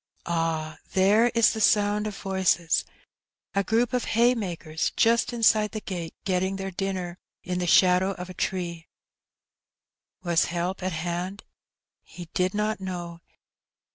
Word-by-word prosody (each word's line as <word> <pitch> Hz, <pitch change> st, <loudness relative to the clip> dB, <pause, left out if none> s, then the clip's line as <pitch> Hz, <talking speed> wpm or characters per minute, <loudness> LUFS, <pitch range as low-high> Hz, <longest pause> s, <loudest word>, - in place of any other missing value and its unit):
Ah, 165 Hz, -2 st, -2 dB
there 205 Hz, +5 st, +4 dB
is 230 Hz, -1 st, +5 dB
the 220 Hz, -, -4 dB
sound 210 Hz, 0 st, +3 dB
of 210 Hz, -, -6 dB
voices; 190 Hz, -3 st, +1 dB, 0.7 s
a 200 Hz, -, +1 dB
group 230 Hz, +5 st, +1 dB
of 250 Hz, -, 0 dB
haymakers 185 Hz, -10 st, 0 dB
just 235 Hz, +2 st, +3 dB
inside 220 Hz, -2 st, +3 dB
the 215 Hz, -, -3 dB
gate 175 Hz, -6 st, -6 dB
getting 190 Hz, 0 st, 0 dB
their 195 Hz, 0 st, -4 dB
dinner 185 Hz, -2 st, -4 dB, 0.2 s
in 180 Hz, 0 st, -2 dB
the 180 Hz, -, -1 dB
shadow 185 Hz, +2 st, +4 dB
of 180 Hz, -1 st, -7 dB
a 185 Hz, -, -9 dB
tree. 170 Hz, -3 st, -3 dB, 1.4 s
Was 170 Hz, -2 st, +2 dB
help 175 Hz, +2 st, -3 dB
at 185 Hz, +1 st, -2 dB
hand? 175 Hz, +4 st, -4 dB, 0.6 s
He 175 Hz, -2 st, -11 dB
did 185 Hz, +2 st, 0 dB
not 210 Hz, -1 st, -1 dB
know. 175 Hz, -2 st, -5 dB
185 Hz, 140 wpm, -26 LUFS, 175-210 Hz, 1.4 s, is